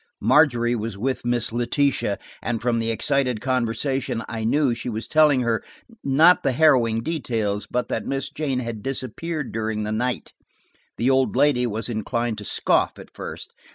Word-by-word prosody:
Margery 120 -6 +4
was 110 -2 -4
with 130 +5 -2
Miss 120 -2 0
Letitia, 120 -2 0 0.2
and 115 -1 -2
from 115 0 0
the 115 0 -1
excited 125 0 0
conversation 130 0 -1
I 110 -1 -4
knew 130 +3 +2
she 115 +1 -5
was 110 0 -4
telling 150 -4 +4
her–not 140 - +2
harrowing 130 -5 +3
details, 115 -9 -2
but 125 0 -1
that 110 - -2
Miss 135 0 -2
Jane 140 -4 -2
had 115 -3 -5
disappeared 135 +4 -4
during 110 -1 -2
the 105 - -3
night. 125 +3 -2 0.6
The 125 +3 +2
old 130 -1 +2
lady 130 -2 +3
was 110 0 -3
inclined 115 0 -2
to 105 - -8
scoff - - +1
at - - -13
first. - - -8
120 Hz, 155 wpm, -23 LUFS, 115-135 Hz, 0.6 s, Margery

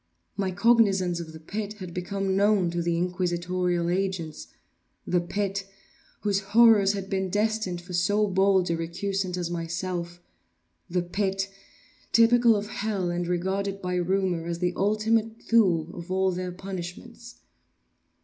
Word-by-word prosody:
My 195 -2 -1
cognizance 195 -4 +3
of 165 -2 -7
the 160 - -10
pit 205 +6 -5
had 185 -5 -9
become 190 +2 -2
known 200 -3 +3
to 175 0 -1
the 170 0 0
inquisitorial 180 0 -1
agents—the 180 - -4
pit, 195 +2 -2 0.6
whose 200 -2 +1
horrors 205 -1 +5
had 195 -1 -4
been 190 -1 -1
destined 210 -3 -1
for 180 +1 -10
so 205 +5 +2
bold 190 -2 +2
a - - +1
recusant 180 +3 -2
as 175 -1 -3
myself—the 170 - -5
pit, 195 +1 -1 0.6
typical 235 0 +5
of 205 0 -2
hell, 200 -5 -2
and 175 0 -2
regarded 190 +3 -1
by 180 -1 -3
rumor 180 -1 0
as 170 -1 -2
the 180 0 0
Ultima 215 +2 +2 0.2
Thule 175 -8 +3
of 170 +1 -9
all 190 0 +2
their 180 0 -4
punishments. 180 -1 -8
185 Hz, 135 wpm, -26 LUFS, 175-200 Hz, 0.6 s, horrors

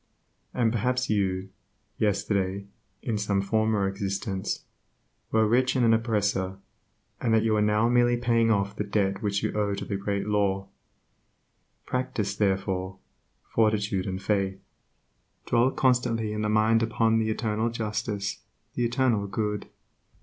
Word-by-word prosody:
And 120 -3 +1
perhaps 125 +2 0
you, 95 -2 0 0.5
yesterday 100 -2 0 0.4
(in 110 -4 -1
some 100 -1 0
former 110 0 +1
existence) 95 -1 -3 0.7
were 110 -1 +3
rich 125 +4 +2
and 125 -2 +3
an 115 - +5
oppressor, 105 -4 0 0.6
and 120 - +1
that 110 - +3
you 110 -1 +2
are 105 - +2
now 105 +2 +3
merely 120 0 +3
paying 115 -1 +2
off 100 -2 +1
the 105 - -2
debt 100 -1 0
which 100 -2 -1
you - - -1
owe 105 -1 0
to - - -5
the 100 - -2
Great 100 0 -2
Law. 100 -2 0 1.2
Practice, 110 -6 -2
therefore, 95 -2 -1 0.5
fortitude 105 -4 +1
and 95 0 -4
faith. 95 -2 0 0.9
Dwell 120 +2 +3
constantly 115 -5 +1
in 105 0 -1
mind 110 +1 +3
upon 115 0 +2
the 110 0 0
Eternal 110 0 0
justice, 105 -2 -3 0.3
the 120 - -1
Eternal 120 -4 +1
Good. 105 +1 -2
105 Hz, 135 wpm, -27 LUFS, 100-115 Hz, 1.2 s, an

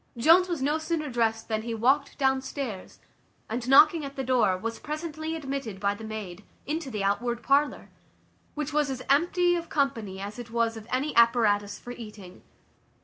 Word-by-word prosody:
Jones 335 +9 +5
was 330 -6 -2
no 300 +3 +1
sooner 315 -3 -2
dressed 225 -2 0
than 220 -1 -1
he 230 0 -4
walked 270 +5 +1
downstairs, 265 -5 -2 0.5
and 240 +3 -4
knocking 305 +4 +6
at 275 0 -7
the 270 - -3
door, 245 -7 +2
was 230 +4 -5
presently 315 +1 -4
admitted 270 -9 -5
by 200 0 +1
the 215 +2 -10
maid, 210 -4 -7 0.2
into 305 -1 -3
the 210 -5 -3
outward 235 +4 -1
parlour, 280 +1 +1 0.6
which 300 0 -3
was 295 -1 +2
as 255 -1 -4
empty 350 +4 +3
of 335 -1 -4
company 230 -10 -1
as 205 +4 -6
it 240 -1 -8
was 230 0 0
of 220 0 -10
any 270 +3 -1
apparatus 220 -4 +3
for 245 - -9
eating. 210 -6 -10
255 Hz, 175 wpm, -27 LUFS, 220-295 Hz, 0.6 s, knocking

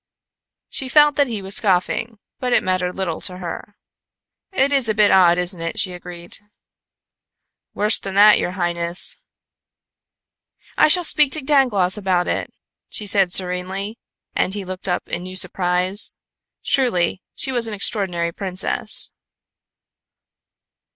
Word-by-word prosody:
She 265 - -5
felt 295 +1 +5
that 285 -1 +3
he 220 -5 -5
was 195 +1 +2
scoffing, 205 +3 0 0.2
but 250 -1 -2
it - - +3
mattered 185 -1 -1
little 180 -4 -3
to 180 - -3
her. 180 +3 -8 0.8
"It 280 -6 +1
is 270 -5 +2
a 215 - 0
bit 210 -1 +4
odd, 175 -2 +5
isn't 180 -1 0
it?" 165 +6 -4
she 185 -3 -1
agreed. 175 -1 -9 1.4
"Worse 210 +2 +1
than 195 -1 -7
that, 210 +1 +6
your 180 - -3
highness." 175 -1 0 1.6
"I - - +5
shall 355 +3 +4
speak 300 -4 +2
to 310 - +1
Dangloss 240 -10 +1
about 185 -3 0
it," - - -3 0.4
she 210 - -3
said 195 -2 +2
serenely, 190 +4 -1 0.4
and 190 - -1
he 200 -2 -5
looked 185 +1 -4
up 180 - -2
in 175 - -4
new 185 +1 -9
surprise. 185 +2 +3 0.5
Truly, 190 -9 0
she 265 - -4
was 240 -3 0
an 215 - -5
extraordinary 180 -4 -1
princess. 185 +1 -1
190 Hz, 140 wpm, -20 LUFS, 180-220 Hz, 1.6 s, that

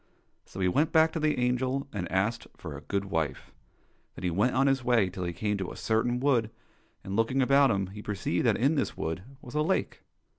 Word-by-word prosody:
So - - -10
he 95 - +3
went 145 - +2
back 160 0 +5
to 165 - -3
the 155 -1 +1
angel 130 +2 0
and 95 -4 -4
asked 105 +5 0
for 80 -4 -7
a 75 - -8
good 100 +4 -2
wife. 80 -6 -3 0.6
Then - - -9
he 90 - 0
went 105 +9 +1
on 135 +1 +3
his 135 -2 +2
way 115 -7 +3
till 90 0 -4
he 85 - -2
came 105 +4 -1
to 95 - -3
a - - -8
certain 120 +2 0
wood, 125 -5 +2 0.5
and, 95 0 -4
looking 115 +5 +1
about 135 +1 +5
him, 100 -3 +1
he 100 +3 -9
perceived 100 -1 -1
that 110 - +3
in 135 +6 +3
this 140 -4 -1
wood 80 +2 -3 0.2
was 120 - -10
a 150 - +1
lake. 175 +5 -1
115 Hz, 225 wpm, -28 LUFS, 95-135 Hz, 0.6 s, back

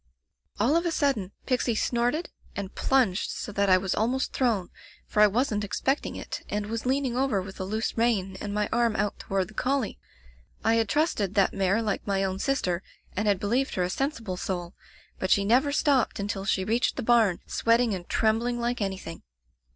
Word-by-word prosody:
"All 245 +9 +3
of 335 - +3
a - - +2
sudden. 275 - 0
Pixie 250 -3 +1
snorted 245 +9 0 0.2
and 200 -1 -5
plunged 245 -8 +2
so - - -5
that 200 0 +1
I 185 - +7
was 190 0 -1
almost 250 +5 0
thrown, 225 -9 0 0.3
for 210 - +1
I 210 - +9
wasn't 210 -1 0
expecting 265 +7 -1
it, - - -6
and 210 0 -2
was 230 +2 -3
leaning 265 -2 +1
over 260 -5 +1
with 190 +1 -8
a - - -2
loose 220 +4 -2
rein 215 -5 +1
and 205 - -4
my 210 0 0
arm 235 -2 +2
out 205 -1 -1
toward 195 0 -1
the - - -13
collie. 260 -1 -1 0.6
I 225 - +3
had 225 -2 +2
trusted 255 - +1
that 195 -2 +3
mare 195 +3 +1
like 210 -1 -2
my 195 -1 +1
own 190 0 -2
sister, 190 -11 0 0.3
and 210 +2 0
had 200 -3 +3
believed 240 +7 0
her 180 - +1
a 180 - -1
sensible 230 -7 -2
soul, 175 -2 -4 0.5
but 185 - -1
she 200 0 +4
never 255 +7 +3
stopped 285 -7 +2
until 200 -1 -3
she 190 -1 +1
reached 225 +5 +1
the - - -3
barn, 225 -6 +4
sweating 230 -1 +2
and 180 -2 -6
trembling 230 +2 +1
like 240 0 -1
anything. 190 - -4
215 Hz, 195 wpm, -27 LUFS, 195-245 Hz, 0.6 s, I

